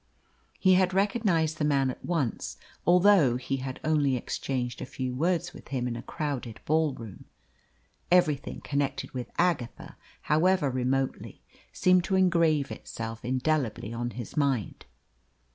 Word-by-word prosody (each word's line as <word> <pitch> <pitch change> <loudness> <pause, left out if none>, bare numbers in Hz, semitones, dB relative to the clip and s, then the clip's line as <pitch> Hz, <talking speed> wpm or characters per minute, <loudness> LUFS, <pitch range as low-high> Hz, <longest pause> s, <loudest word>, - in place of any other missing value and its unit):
He 185 -1 +4
had 185 0 +3
recognised 195 -6 +1
the - - 0
man 140 -3 +2
at - - -12
once, 155 -10 -2 0.3
although 175 -8 +5
he 135 +2 -2
had 130 0 -5
only 145 -4 +2
exchanged 125 0 -3
a - - -3
few 130 -1 -4
words 175 +5 0
with - - -13
him 125 -2 -2
in 120 - -3
a 120 - -5
crowded 130 -6 -4
ball 155 -2 +2
room. 110 -5 -10 0.9
Everything 155 -6 +2
connected 140 -1 -2
with 125 -3 -5
Agatha, 170 -9 -1 0.3
however 160 -1 +2
remotely, 130 +1 -2 0.3
seemed 185 -1 +3
to 190 - 0
engrave 165 -6 +3
itself 115 0 -6
indelibly 130 -4 -1
on 120 +1 -2
his 120 - -7
mind. 135 -7 -1
140 Hz, 140 wpm, -28 LUFS, 125-175 Hz, 0.9 s, although